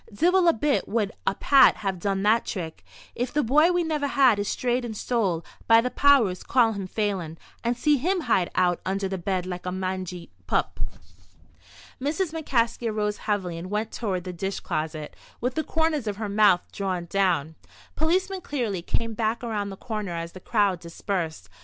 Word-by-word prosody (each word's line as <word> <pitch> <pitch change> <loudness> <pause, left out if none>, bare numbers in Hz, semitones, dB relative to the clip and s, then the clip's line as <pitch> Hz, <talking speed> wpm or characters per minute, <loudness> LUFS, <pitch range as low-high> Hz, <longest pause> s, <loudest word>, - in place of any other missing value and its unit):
"Divil 350 - +3
a 335 - +6
bit 285 +5 0
would 215 -3 0 0.2
a - - +2
Pat 275 +6 +6
have 195 -3 -3
done 195 +1 -1
that 220 +3 +4
trick. 165 -5 -5 0.3
If 245 +1 -2
the 295 - +1
bye 300 +8 +5
we 355 -1 +2
never 305 -3 -1
had 265 -6 +4
is 205 - -1
strayed 245 +2 0
and 220 -3 -5
stole, 195 -10 0 0.2
by 225 0 +7
the 250 +2 -1
powers, 255 -11 +4
call 240 -3 +3
him 195 -2 -5
Phelan, 185 -6 -2 0.3
and 235 0 0
see 295 +3 +3
him 355 +7 0
hide 185 - +1
out 180 -1 +2
under 195 +1 -1
the 190 -1 -4
bed 185 0 -1
like 180 0 -5
a - - -1
mangy 185 - -4 0.2
pup." - - 0 1.2
Mrs. 310 +5 -1
McCaskey 235 -7 0
arose 210 -1 -1
heavily, 185 -5 -1
and 180 +2 -7
went 215 +2 -2
toward 190 -6 -2
the 180 0 -6
dish 195 +3 -3
closet, 155 -1 -4 0.2
with 250 +2 -1
the 315 - -1
corners 320 -7 0
of 205 -1 -2
her 215 -1 -3
mouth 200 -3 +5
drawn 185 -3 -2
down. 170 -4 +1 0.4
Policeman 370 +4 0
Cleary 235 - -2
came 230 +6 -2
back 225 +2 -1
around 210 -4 -2
the 195 - -8
corner 210 -6 -4
as 170 0 -4
the 185 - -10
crowd 200 -3 +1
dispersed. 170 - -4
210 Hz, 185 wpm, -25 LUFS, 185-250 Hz, 1.2 s, by